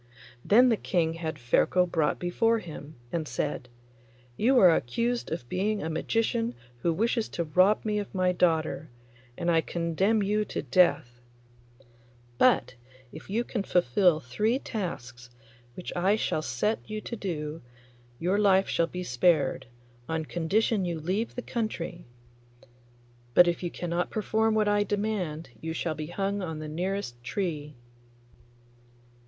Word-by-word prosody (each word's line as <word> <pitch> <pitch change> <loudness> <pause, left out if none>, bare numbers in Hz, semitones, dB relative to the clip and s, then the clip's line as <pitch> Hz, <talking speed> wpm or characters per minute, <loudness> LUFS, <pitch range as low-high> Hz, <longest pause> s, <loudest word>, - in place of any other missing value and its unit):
Then 245 +5 +6
the 225 - +2
King 165 -5 0
had 165 -1 -4
Ferko 150 +9 +2
brought 160 -4 0
before 225 +6 +1
him, 155 -6 -9 0.2
and 160 -3 -2
said, 140 -4 -3 0.7
'You 255 - +3
are 185 -7 +7
accused 235 - -1
of 160 -7 -4
being 205 - -1
a 160 - -2
magician 230 +7 0 0.2
who 170 - +1
wishes 225 +5 0
to 170 - -2
rob 185 +8 +3
me 210 -1 0
of 205 - -5
my 185 -1 +2
daughter, 160 -3 +1 0.5
and 170 0 0
I 165 -1 +4
condemn 175 +7 0
you 210 +2 +1
to - - -4
death; 140 -5 +2 1.2
but 255 - +4 0.4
if - - -11
you 225 +4 0
can 235 -3 -3
fulfil 180 -1 +3
three 210 - 0
tasks 130 - -6 0.5
which 180 - -6
I 190 +4 +3
shall 155 - -1
set 155 - -1
you 215 0 -3
to 235 - -5
do 160 -6 -4 0.6
your 185 +7 +1
life 195 -2 +4
shall 170 - +1
be 180 +1 -5
spared, 140 -2 +2 0.4
on 160 -1 -1
condition 195 +6 +1
you 170 -2 -2
leave 190 +9 -2
the 245 - -4
country; 180 -7 -4 1.3
but 180 - +8
if 170 -1 0
you 175 - -2
cannot 175 +1 -2
perform 220 +1 +1
what 215 -1 +2
I 205 0 +3
demand 200 - -2
you 160 0 -3
shall 165 0 -2
be 155 0 -6
hung 195 +3 -2
on 160 -4 -4
the 155 0 -6
nearest 165 -6 -3
tree. 150 -1 -3
180 Hz, 150 wpm, -28 LUFS, 160-210 Hz, 1.3 s, but